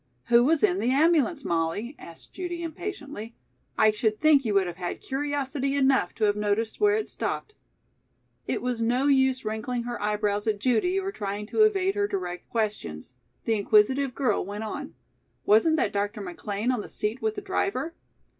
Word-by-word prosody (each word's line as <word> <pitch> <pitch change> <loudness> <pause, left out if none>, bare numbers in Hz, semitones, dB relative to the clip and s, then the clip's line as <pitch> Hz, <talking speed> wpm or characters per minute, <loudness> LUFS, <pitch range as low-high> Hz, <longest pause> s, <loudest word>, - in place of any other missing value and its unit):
"Who 240 0 +6
was 305 +3 +2
in 385 -2 +3
the 240 - +1
ambulance, 305 +1 +3
Molly?" 170 - -1
asked 165 -1 -12
Judy 350 -2 -4
impatiently. 305 - -6 0.4
"I 215 - +5
should 215 0 -1
think 300 -3 +5
you 215 -4 -1
would 195 -1 +4
have 175 -1 -6
had 175 -1 -4
curiosity 275 0 -2
enough 265 -9 +2
to 220 - -3
have 205 -1 +3
noticed 210 +2 -1
where 415 0 +5
it 435 - -1
stopped." 430 - -3 0.9
It - - -2
was 245 -2 -1
no 245 +4 +1
use 265 -3 +3
wrinkling 235 +3 -2
her 240 -2 -5
eyebrows 210 0 0
at 215 -2 +1
Judy 255 - +1
or 390 0 -3
trying 205 - -4
to 435 - 0
evade 390 -2 +1
her 405 0 0
direct 180 - -5
questions. 210 - -3 0.3
The 225 - +2
inquisitive 225 +6 +3
girl 250 -7 +1
went 205 +3 -5
on: 280 +7 -6 0.5
"Wasn't 225 +10 +5
that 210 - 0
Dr. 205 +2 -2
McLean 200 +5 -3
on 245 -4 -1
the - - -10
seat 215 +5 -2
with 440 0 -1
the 410 - -5
driver?" 385 -4 -2
240 Hz, 180 wpm, -26 LUFS, 210-295 Hz, 0.9 s, Who